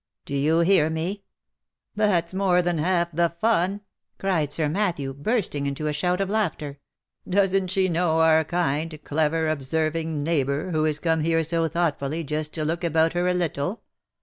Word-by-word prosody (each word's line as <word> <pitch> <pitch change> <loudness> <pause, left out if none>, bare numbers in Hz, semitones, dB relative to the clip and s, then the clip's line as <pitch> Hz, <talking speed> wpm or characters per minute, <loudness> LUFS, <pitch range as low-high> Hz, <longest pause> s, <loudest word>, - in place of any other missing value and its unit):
Do - - -7
you 155 +4 +2
hear 170 -3 +4
me? 175 +6 -3 0.7
That's 190 -5 +1
more 185 -2 +2
than 175 -2 0
half 170 +1 +1
the 170 +1 +2
fun," 205 -2 +1 0.4
cried 165 -7 0
Sir 155 -1 0
Matthew, 165 -6 -1
bursting 145 - -1
into 140 +2 -3
a 150 - 0
shout 180 +5 0
of 195 - 0
laughter. 160 -9 -2 0.2
" - - -22
Doesn't 195 0 +2
she 185 +1 +1
know 170 -2 +1
our 160 0 +5
kind, 160 -1 -1
clever, 160 +2 0
observing, 155 +1 -1
neighbour, 145 +1 0
who 155 -1 +1
is 155 -1 0
come 160 +1 0
here 165 +1 +1
so 165 +1 0
thoughtfully, 160 -1 -1
just 150 +1 -3
to 155 -2 -2
look 165 +3 -2
about 160 -1 +2
her 175 +1 0
a 180 - +2
little 175 +2 -2
165 Hz, 175 wpm, -24 LUFS, 155-180 Hz, 0.7 s, our